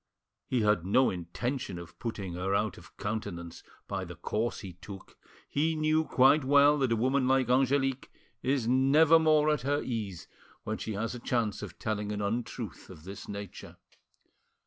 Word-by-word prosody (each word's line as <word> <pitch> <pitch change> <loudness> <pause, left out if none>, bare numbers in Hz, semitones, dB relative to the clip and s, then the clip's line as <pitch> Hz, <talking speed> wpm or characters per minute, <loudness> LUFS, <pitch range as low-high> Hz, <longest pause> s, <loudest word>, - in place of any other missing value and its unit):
He 125 -3 +1
had 105 -5 +2
no 125 +8 +3
intention 95 +5 -4
of 85 -1 -11
putting 100 -6 -4
her 95 +3 -1
out 105 -2 -1
of - - -18
countenance 100 -5 -5 0.3
by - - -3
the - - -8
course 115 +3 -2
he 95 -3 -8
took; 95 +3 -11 0.3
he 160 +3 0
knew 155 +1 +2
quite 135 +3 +4
well 145 +2 +5
that 130 -3 +1
a - - +4
woman 130 +3 +1
like 130 -2 +2
Angelique 135 0 +1 0.3
is 130 -3 0
never 145 +6 +5
more 155 -1 +4
at 150 -4 0
her 145 +3 0
ease 105 -8 -4
than - - -28
when 110 0 -3
she 110 - -4
has 110 +4 -2
a 125 - -6
chance 115 -4 -1
of - - -8
telling 105 -1 -2
an 105 - -3
untruth 110 - -4
of 75 - -12
this 100 +2 -9
nature. 100 -2 -8
120 Hz, 175 wpm, -30 LUFS, 100-135 Hz, 0.3 s, well